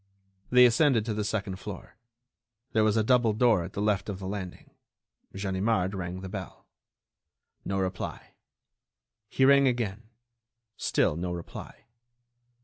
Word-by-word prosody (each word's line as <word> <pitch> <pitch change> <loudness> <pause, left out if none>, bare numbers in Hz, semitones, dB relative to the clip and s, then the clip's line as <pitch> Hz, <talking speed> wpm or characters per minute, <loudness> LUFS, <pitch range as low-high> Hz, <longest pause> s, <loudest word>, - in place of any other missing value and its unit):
They 125 0 +7
ascended 120 -1 +3
to 115 - -2
the 105 0 -2
second 100 -2 -3
floor. 100 +1 -9 0.8
There 110 - +3
was 110 0 +2
a 110 - +3
double 120 -1 +3
door 110 -5 +3
at 85 - -8
the 100 - -2
left 105 -1 0
of 100 - -4
the 95 - -8
landing. 95 -2 -6 0.6
Ganimard 95 0 0
rang 90 -1 -5
the 95 - -6
bell. 95 -1 -8 1.0
No 95 - -2
reply. 95 -1 -4 1.0
He 130 - +2
rang 140 0 +6
again. 115 -3 -2 0.7
Still 75 - +1
no 90 +2 -3
reply. 85 -1 -8
105 Hz, 140 wpm, -28 LUFS, 95-115 Hz, 1.0 s, They